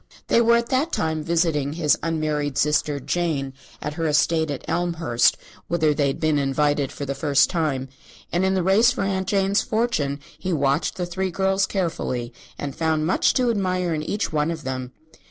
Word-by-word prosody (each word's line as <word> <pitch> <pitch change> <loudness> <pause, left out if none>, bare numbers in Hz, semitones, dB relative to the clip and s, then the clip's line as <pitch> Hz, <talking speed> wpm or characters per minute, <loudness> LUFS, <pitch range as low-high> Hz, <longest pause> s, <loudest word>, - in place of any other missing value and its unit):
They 235 - +5
were 235 0 +5
at 235 0 0
that 280 +6 +1
time 160 -1 -1
visiting 160 -3 0
his 155 -3 +2
unmarried 155 -3 -1
sister, 150 -1 +1
Jane, 145 -3 -2 0.3
at 150 - -3
her 165 +1 -2
estate 160 +1 +2
at 140 - -5
Elmhurst, 165 -9 +1 0.3
whither 155 -3 +2
they 145 -1 +1
had 135 - -2
been 155 -2 +2
invited 145 0 +1
for 140 - -6
the 140 - -2
first 140 0 +2
time; 150 -7 -1 0.4
and 175 +2 +1
in 190 0 +2
the 185 - +1
race 200 +6 +5
for 250 -5 -1
Aunt 190 -1 -1
Jane's 195 0 +2
fortune 215 - -1 0.2
he 185 - -3
watched 140 0 +1
the 180 - -2
three 190 +2 -2
girls 190 +2 +1
carefully 160 - -2 0.2
and 140 -2 -5
found 160 -1 0
much 180 - +2
to 250 -2 +2
admire 185 -4 0
in 155 - -2
each 200 +4 -2
one 150 +1 +1
of 165 -2 -4
them. 130 -1 -4
160 Hz, 190 wpm, -23 LUFS, 145-190 Hz, 0.4 s, They